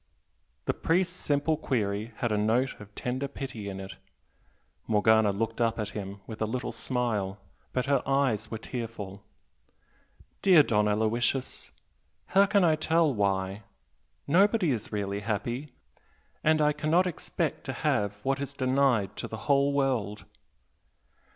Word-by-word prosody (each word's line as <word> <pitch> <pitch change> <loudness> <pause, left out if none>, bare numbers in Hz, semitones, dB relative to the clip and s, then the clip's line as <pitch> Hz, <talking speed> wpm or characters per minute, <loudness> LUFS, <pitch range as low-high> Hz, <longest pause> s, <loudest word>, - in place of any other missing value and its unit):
The - - +1
priest's 180 +2 +1
simple 145 -1 +1
query 110 -4 -1
had 120 - -1
a - - +2
note 115 +5 +1
of 105 0 -13
tender 130 +3 -2
pity 125 -7 -6
in 95 -1 -6
it. 95 0 -8 0.9
Morgana 110 0 +4
looked 115 +3 -2
up 115 -1 +2
at 105 -2 -2
him 100 -1 -6
with 110 -1 -8
a 110 - +1
little 125 +3 -3
smile, 110 -6 -2 0.3
but 125 - -1
her 140 -1 +2
eyes 130 -6 +1
were 110 - -4
tearful. 110 -5 -6 1.2
"Dear 180 -6 +7
Don 105 -5 +2
Aloysius, 110 +5 0 0.6
how 200 +1 +4
can 200 -1 +3
I 160 -3 +5
tell 160 -1 +2
'why'? 100 -1 0 0.6
Nobody 190 +2 +4
is 110 -4 -3
really 100 -1 -2
happy, 115 +7 -3 0.7
and 155 0 +4
I 150 0 +3
cannot 155 +5 +2
expect 180 -4 -2
to - - -3
have 100 0 0
what 135 0 +1
is 140 0 -5
denied 130 -6 +2
to - - -4
the 110 - -6
whole 140 0 +3
world!" 125 -7 0
120 Hz, 145 wpm, -28 LUFS, 105-140 Hz, 1.2 s, Dear